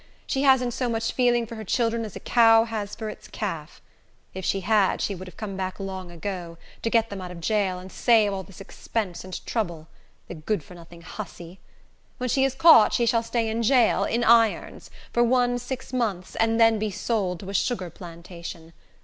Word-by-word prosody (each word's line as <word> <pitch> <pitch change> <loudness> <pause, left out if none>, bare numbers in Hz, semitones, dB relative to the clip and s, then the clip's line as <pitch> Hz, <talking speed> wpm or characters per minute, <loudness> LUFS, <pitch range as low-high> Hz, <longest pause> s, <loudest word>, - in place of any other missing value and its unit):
She 270 - -1
hasn't 260 -3 +4
so 250 0 -1
much 225 0 -1
feeling 240 -2 +2
for 230 - -10
her 220 -1 -6
children 230 +2 0
as 210 - -9
a - - -6
cow 225 -2 +5
has 215 -3 -5
for 220 - -6
its 215 - -9
calf. - - -6 0.5
If 190 - -6
she 195 +2 0
had, 205 -1 +2
she 200 - -1
would 185 0 -8
have 180 - -13
come 205 -3 -5
back 190 0 -4
long 190 -2 -6
ago, 175 -1 -6 0.2
to 230 - -1
get 230 -1 +2
them 195 -2 -5
out 180 - -6
of 180 -1 -9
jail, 195 0 0
and 185 +1 -10
save 220 -4 +3
all 190 - -3
this 190 0 -14
expense 195 -2 -4
and 185 0 -8
trouble. 170 -8 -3 0.4
The - - -7
good 165 +2 -2
for 180 - -14
nothing 170 0 -14
hussy! 180 -3 -9 0.6
When 250 0 -3
she 265 +3 +2
is 270 -1 +1
caught, 265 -6 +7
she 240 - +2
shall 230 0 +2
stay 230 0 -1
in 220 +1 -1
jail, 240 0 +3
in 235 +1 0
irons, 230 -2 +3 0.2
for 240 - +3
one 245 0 +2
six 250 +1 -6
months, 210 -8 -2
and 225 0 +2
then 225 -1 +5
be 215 0 -1
sold 190 -3 -2
to 195 - -8
a - - -7
sugar 190 -4 -1
plantation. 170 -1 -10
215 Hz, 210 wpm, -25 LUFS, 185-235 Hz, 0.6 s, caught